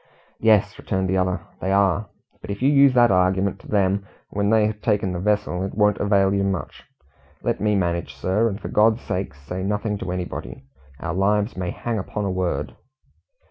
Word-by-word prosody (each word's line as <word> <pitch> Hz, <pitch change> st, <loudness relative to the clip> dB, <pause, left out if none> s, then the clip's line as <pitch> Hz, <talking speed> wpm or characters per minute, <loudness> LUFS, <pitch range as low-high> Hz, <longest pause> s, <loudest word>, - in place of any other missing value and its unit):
"Yes," 105 Hz, -2 st, +3 dB
returned 95 Hz, -2 st, -1 dB
the 95 Hz, -, +1 dB
other, 90 Hz, 0 st, 0 dB, 0.2 s
"they 95 Hz, -, -2 dB
are. 100 Hz, +1 st, +2 dB, 0.3 s
But -, -, -10 dB
if 100 Hz, +4 st, -4 dB
you 140 Hz, -, +5 dB
use 140 Hz, -2 st, +6 dB
that 120 Hz, -2 st, +6 dB
argument 95 Hz, +1 st, +2 dB
to -, -, -15 dB
them 100 Hz, -1 st, +1 dB, 0.2 s
when 100 Hz, 0 st, 0 dB
they 110 Hz, -1 st, +4 dB
have 105 Hz, 0 st, -3 dB
taken 105 Hz, -4 st, +1 dB
the 90 Hz, -, -3 dB
vessel, 100 Hz, -2 st, 0 dB
it 95 Hz, -, -5 dB
won't 105 Hz, -1 st, +3 dB
avail 100 Hz, -1 st, +3 dB
you 100 Hz, 0 st, +1 dB
much. 95 Hz, -3 st, -3 dB, 0.6 s
Let -, -, -1 dB
me 105 Hz, 0 st, +2 dB
manage, 85 Hz, -3 st, -1 dB
sir; 105 Hz, +5 st, +1 dB
and 100 Hz, 0 st, -5 dB
for -, -, -6 dB
God's 110 Hz, +2 st, +3 dB
sake, 90 Hz, -6 st, -3 dB
say 75 Hz, +7 st, -6 dB
nothing 105 Hz, +1 st, -2 dB
to 90 Hz, -, -4 dB
anybody. 90 Hz, -1 st, -5 dB, 0.4 s
Our 80 Hz, -1 st, -3 dB
lives 105 Hz, +4 st, +1 dB
may 90 Hz, -2 st, -3 dB
hang 115 Hz, +2 st, -3 dB
upon 100 Hz, +2 st, -4 dB
a 95 Hz, -, -1 dB
word." 90 Hz, -6 st, -2 dB
100 Hz, 195 wpm, -23 LUFS, 95-105 Hz, 0.6 s, use